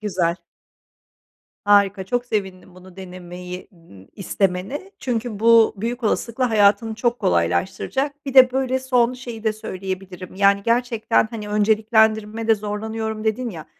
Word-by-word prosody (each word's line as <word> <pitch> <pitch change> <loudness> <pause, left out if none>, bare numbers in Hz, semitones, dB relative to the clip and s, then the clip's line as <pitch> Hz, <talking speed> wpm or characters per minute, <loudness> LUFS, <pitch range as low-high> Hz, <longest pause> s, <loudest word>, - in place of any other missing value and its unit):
Güzel. 180 -5 -1 1.3
Harika 200 -1 +3
çok 245 +5 -2
sevindim 190 -5 -4
bunu 185 0 -16
denemeyi 180 -1 -9
n 130 - -18
istemene 195 - -2
çünkü 235 -3 -3
bu 230 0 +5
büyük 235 +5 -4
olasılıkla 230 +3 -1
hayatını 215 +1 +3
çok 240 +1 -1
kolaylaştıracak. 190 - -1
Bir 275 - -4
de, 255 -1 +8
böyle, 260 0 0
son 250 -2 +1
şeyi 240 -3 -9
de 220 - +2
söyleyebilirim; 190 -3 -7
yani 200 0 +3
gerçekten, 230 -1 +1
hani, 210 -3 -7
önceliklendirmede 220 +1 +2
zorlanıyorum 220 +1 -4
dedin 230 +3 -1
ya, 165 -5 -9
215 Hz, 125 wpm, -21 LUFS, 190-235 Hz, 1.3 s, de